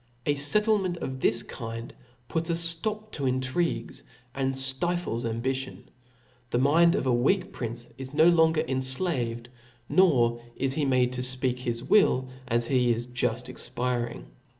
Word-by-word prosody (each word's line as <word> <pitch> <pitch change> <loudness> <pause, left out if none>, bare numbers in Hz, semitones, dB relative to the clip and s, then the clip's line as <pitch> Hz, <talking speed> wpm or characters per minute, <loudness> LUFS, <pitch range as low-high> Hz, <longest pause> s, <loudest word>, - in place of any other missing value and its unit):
A 145 - +2
fettlement 190 +5 +2
of 130 -5 -5
this 115 -1 +1
kind 115 -1 -7 0.3
puts 165 +4 -2
a - - +2
ftop 170 +6 +1
to 140 -3 -2
intrigues, 130 +6 -1 0.3
and 135 -1 -1
ftifles 130 -2 +1
ambition; 130 +3 -4 0.6
the 120 - 0
mind 160 +6 +4
of - - -1
a 130 - +2
weak 140 +11 +1
prince 120 0 -6
is 130 0 -7
no 155 +3 +4
longer 160 -2 +4
enflaved, 130 -3 -2 0.4
nor 120 -11 +3
is 135 0 0
he 150 0 0
made 125 -2 +2
to 125 - -3
fpeak 125 0 -1
his 120 -1 -3
will 130 -6 +3 0.2
as 120 0 +1
he 125 -1 +2
is 120 +1 -1
juft 125 -1 -2
expiring. 120 -1 -3
130 Hz, 150 wpm, -27 LUFS, 120-160 Hz, 0.6 s, mind